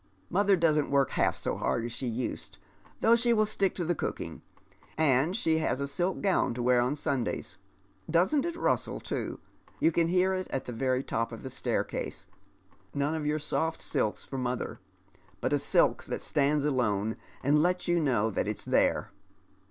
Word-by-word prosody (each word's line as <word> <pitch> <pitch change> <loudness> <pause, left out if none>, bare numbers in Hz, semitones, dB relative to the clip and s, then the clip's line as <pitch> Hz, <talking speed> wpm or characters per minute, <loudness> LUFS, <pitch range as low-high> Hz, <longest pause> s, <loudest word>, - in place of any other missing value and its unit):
" 95 - -35
Mother 200 +2 +4
doesn't 155 -4 +2
work 140 -1 +2
half - - +2
so - - -3
hard 65 - 0
as 120 - -4
sho 120 +3 -4
used, 120 +2 -4 0.4
though 230 +1 +6
she 235 0 +3
will 215 -1 +3
stick 200 -2 0
to 175 - -2
the 175 - +1
cooking; - - -4 0.6
and 155 +3 +3
she 160 -7 +2
has 155 - 0
a 140 - -1
silk 175 +6 -1
gown 190 -11 +2
to 120 - -3
wear 125 0 +4
on 125 +4 0
Sundays, 135 - -2 0.3
— 100 - -36
doesn't 185 - +3
it 340 -1 -3
rustle - - 0
too! - - -4 0.4
you 165 - +4
can 165 0 +2
hear 185 +2 +2
it 185 0 -2
at 135 - -3
the 125 - -5
very 130 +2 0
top 115 -2 -2
of 115 - -8
the 130 - -6
staircase, - - -3 0.4
— - - -34
none 145 +2 0
of 155 -2 -2
your 150 +1 +1
soft 160 +2 -1
silks 105 - -1
for 135 - -5
mother, 125 -1 -3 0.6
but - - 0
a - - +3
silk - - +2
that - - -4
stands 145 0 +1
alone 110 -6 +1 0.3
and 145 +3 +4
lets 180 +2 +1
you 175 0 +3
know 120 -8 +1
that - - -1
it's - - -4
tiiere. - - +2
150 Hz, 195 wpm, -29 LUFS, 125-175 Hz, 0.6 s, though